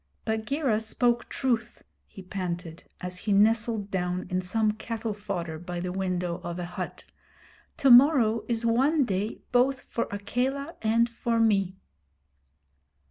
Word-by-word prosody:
'Bagheera 220 +2 0
spoke 240 +2 0
truth,' 240 -4 -1 0.2
he 195 - -11
panted, 175 -3 -5 0.2
as 180 0 -4
he 210 - -2
nestled 215 0 +2
down 180 -1 -1
in 185 0 +1
some 215 +4 +1
cattle 220 0 -4
fodder 175 -6 -4
by 175 +1 -5
the 180 +1 -3
window 180 -2 -2
of 175 0 -4
a 175 - -3
hut. 175 - -6 0.7
'To 270 - +4
morrow 240 -4 +6
is 235 -1 -1
one 270 +6 +3
day 200 +1 -3
both 255 +1 +3
for 235 - -3
Akela 260 +9 -2
and 230 +1 +3
for 235 0 -1
me.' 195 -4 +2
215 Hz, 135 wpm, -27 LUFS, 185-235 Hz, 0.7 s, morrow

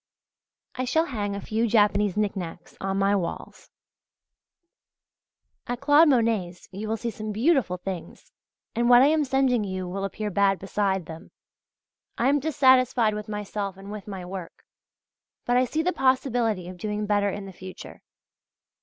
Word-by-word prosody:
I 255 - -3
shall 320 +6 +2
hang 205 -8 -3
a - - -4
few 220 +3 -1
Japanese 210 -2 +2
knick 210 -1 0
knacks 175 -2 -7
on 195 0 -1
my 195 +1 +3
walls. 180 -4 -5 2.0
At 245 0 -3
Claude 295 +3 +5
Monet's 225 -9 0
you 205 +3 -6
will 225 - 0
see 235 +2 -3
some 215 -1 -6
beautiful 230 - +2
things, 180 -1 -7 0.4
and 240 +1 +1
what 245 +1 +8
I 280 - +5
am 310 -1 +2
sending 265 -4 +2
you 185 -2 -4
will 195 +2 -4
appear 210 +1 -3
bad 195 0 +3
beside 195 -2 -1
them. 165 +2 -10 0.9
I 245 - +2
am 290 +1 +3
dissatisfied 260 -6 +3
with 210 +1 -6
myself 205 -2 -4
and 195 +1 -10
with 210 -1 -8
my 190 -3 -6
work; 180 -2 -8 0.8
but 245 - +1
I 250 +1 +4
see 310 +6 -1
the 360 +2 +1
possibility 245 -7 +1
of 180 0 -9
doing 210 +2 -3
better 205 -1 +1
in 200 0 -5
the 195 - -10
future. 185 +1 -10
210 Hz, 165 wpm, -25 LUFS, 195-245 Hz, 2.0 s, what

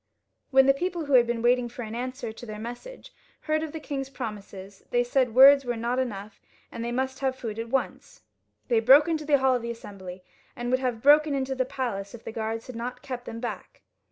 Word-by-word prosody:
When 265 -1 +5
the 275 - +5
people 345 +2 -3
who 285 - -2
had 240 -2 +6
been 235 -1 -2
waiting 245 0 +3
for 245 +1 -7
an 220 0 -7
answer 250 -1 -5
to 240 - -11
their 215 -1 -6
message 245 - -9 0.3
heard 310 0 0
of 315 -1 -4
the 320 - -6
king's 275 -3 -5
promises, 200 -6 -8
they 245 0 +2
said 245 -1 0
words 275 +2 +8
were 245 -2 -2
not 240 +3 -1
enough, 210 -5 -5 0.3
and 230 - -6
they 235 - -3
must 260 +1 -2
have 265 -1 0
food 225 -4 -6
at 230 0 -5
once. 265 +2 -3 0.4
They 235 - +3
broke 270 +7 +7
into 315 -2 -1
the 290 -1 +4
hall 265 -1 +3
of 245 -2 -1
Assembly, 195 -6 -8 0.3
and 240 0 -4
would 255 - +3
have 245 -4 -2
broken 295 +1 +5
into 265 -1 -1
the 260 -1 -1
palace 230 -6 -4
if 235 - -13
the - - -6
guards 225 0 -4
had 255 - -9
not 245 +3 -6
kept 250 -3 -6
them 230 0 -7
back. 240 - -7
245 Hz, 225 wpm, -26 LUFS, 230-270 Hz, 0.4 s, words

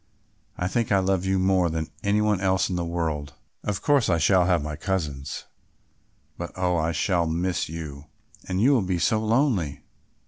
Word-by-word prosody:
I 90 - -1
think 115 +3 -1
I 100 - +5
love 95 -1 +1
you 95 0 +1
more 95 -2 +3
than 80 0 -3
any 105 +1 +2
one 105 -3 +1
else 95 0 +1
in - - -1
the 85 - -1
world. 80 -4 -3 0.3
Of 105 -2 -3
course 145 -7 +3
I 85 - +3
shall 90 +3 +4
have 85 -5 +2
my 75 0 -4
cousins, 75 -5 -3 0.9
but, - - -5
oh! 90 -1 +1
I 80 0 +1
shall 85 0 +1
miss 85 +2 -1
you; 75 -3 -7 0.4
and 95 0 -1
you 125 +7 +5
will 130 -5 +4
be 90 -1 -1
so 110 +5 +1
lonely." 110 - +1
90 Hz, 185 wpm, -25 LUFS, 80-100 Hz, 0.9 s, I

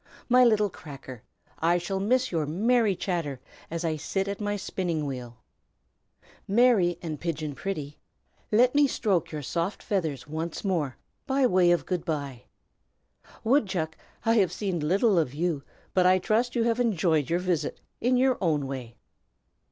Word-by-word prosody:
My 250 0 +6
little 210 -4 +3
Cracker, 135 -7 -10 0.4
I 170 +2 +3
shall 185 +2 -3
miss 255 +6 +1
your 160 -4 0
merry 215 +5 +2
chatter 165 -8 -2 0.3
as 170 +1 -3
I 160 -1 0
sit 195 +6 -2
at 200 +1 -4
my 205 0 -1
spinning 175 -5 -2
wheel. 125 -4 -6 1.1
Mary, 205 -6 +4
and 155 -3 -4
Pigeon 155 -3 -3
Pretty, 150 -4 -5 0.5
let 245 +4 +4
me 290 0 +5
stroke 190 - 0
your 150 -2 -5
soft 170 +8 -2
feathers 160 - -2
once 160 +2 -4
more, 160 -9 -1 0.3
by 270 0 +2
way 180 -6 +4
of 175 -1 +2
'good 180 -3 -2
by.' 140 -7 -4 1.0
Woodchuck, 190 - +1 0.3
I 225 +1 +4
have 190 -5 +3
seen 185 -2 -2
little 190 +5 +3
of 145 -4 -1
you, 165 -2 -1 0.3
but 180 -1 +4
I 185 0 +6
trust 225 +7 0
you 235 - +2
have 230 +1 +1
enjoyed 170 - +1
your 170 - +2
visit, 180 -3 -1 0.2
in 250 +1 +2
your 255 0 +2
own 155 -6 +1
way. 130 -4 -6
175 Hz, 160 wpm, -27 LUFS, 155-210 Hz, 1.1 s, My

